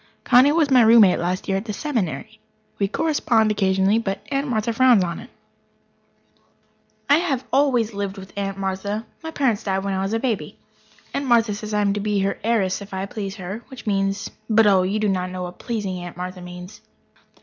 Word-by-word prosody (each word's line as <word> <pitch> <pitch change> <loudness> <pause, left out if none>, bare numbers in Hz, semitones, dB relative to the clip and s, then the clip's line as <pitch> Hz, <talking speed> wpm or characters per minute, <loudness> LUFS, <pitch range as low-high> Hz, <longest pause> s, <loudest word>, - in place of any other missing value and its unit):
Connie 260 +3 +6
was 305 -3 +2
my 255 -2 +7
roommate 220 -4 +6
last 180 +2 -2
year 195 -1 +1
at 195 - -5
the 215 - -4
Seminary. 220 - -3 0.4
We 200 - +2
correspond 230 -4 +1
occasionally, 195 +1 +2
but 195 -3 -4
Aunt 275 +1 0
Martha 230 -2 -1
frowns 245 -4 +5
on 170 -1 -4
it. - - -12 1.8
I 285 - +6
have 290 -7 -1
always 255 -5 +2
lived 200 0 -4
with 190 0 -11
Aunt 195 -1 -3
Martha 195 +3 -3 0.2
my 320 - -6
parents 260 -9 0
died 195 -1 -1
when 200 -1 -2
I 190 - -1
was 195 +2 -2
a 225 - +1
baby. 230 -5 -3 0.6
Aunt 280 -1 -2
Martha 230 -3 +3
says 215 +1 -6
I 210 0 +1
am 200 -1 +2
to 205 - -2
be 210 0 -1
her 195 +1 -1
heiress 210 -4 +1
if 200 -1 -8
I 190 +1 -2
please 200 -1 -6
her 195 +3 -6
which 260 -3 -11
means 195 -1 -1 0.2
but, 225 0 +5
oh, 195 -2 +5
you 190 +3 -1
do 215 0 0
not 185 -2 -1
know 180 0 -5
what 180 0 -8
"pleasing" 205 -6 -3
Aunt 175 -1 -8
Martha 180 0 -6
means. 180 +2 -10
205 Hz, 205 wpm, -22 LUFS, 190-230 Hz, 1.8 s, my